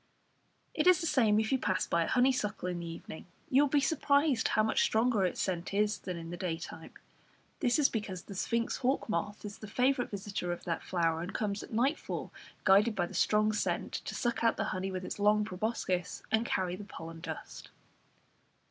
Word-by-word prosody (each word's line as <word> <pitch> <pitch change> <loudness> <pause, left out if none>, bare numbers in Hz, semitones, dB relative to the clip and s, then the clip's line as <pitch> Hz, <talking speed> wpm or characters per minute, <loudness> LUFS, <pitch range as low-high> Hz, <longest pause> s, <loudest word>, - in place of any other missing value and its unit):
It 310 +2 +1
is 365 -1 +7
the 340 - -3
same 225 -9 +3
if 220 0 -1
you 265 - +2
pass 190 -5 0
by 170 0 +1
a - - -5
honeysuckle 245 -7 +1
in 180 -1 -2
the 170 - -5
evening; 165 0 -8 0.2
you 270 +2 +6
will 290 - +3
be 290 - +4
surprised 285 -1 +2
how 215 - +2
much 220 - +2
stronger 220 -3 +3
its 180 - -2
scent 185 +1 -2
is 210 +1 +2
than 180 -2 -5
in 165 0 -7
the 175 - -5
day 170 -2 -2
time. 165 -1 -9 0.7
This 245 - +2
is 295 -3 +5
because 195 -5 -4
the 200 - -9
sphinx 230 +4 -1
hawk 265 +2 0
moth 205 +1 -3
is 205 -1 -7
the 215 - -8
favourite 250 +4 +1
visitor 195 -3 -4
of 175 - -5
that 170 -1 -2
flower, 165 -3 0
and 180 +3 -6
comes 205 -2 -1
at - - -11
nightfall, 260 +8 -1 0.3
guided 210 +4 +5
by 180 -3 +1
the - - -10
strong 215 0 +3
scent, 210 - -1
to - - -4
suck 240 -1 -1
out 230 - +3
the - - 0
honey 190 +1 -2
with 185 -1 -4
its - - -5
long 210 +1 +4
proboscis, 185 -3 -2
and 220 +2 +2
carry 180 -1 0
the 205 - -8
pollen 165 -4 -9
dust. - - -7
210 Hz, 210 wpm, -31 LUFS, 180-240 Hz, 0.7 s, is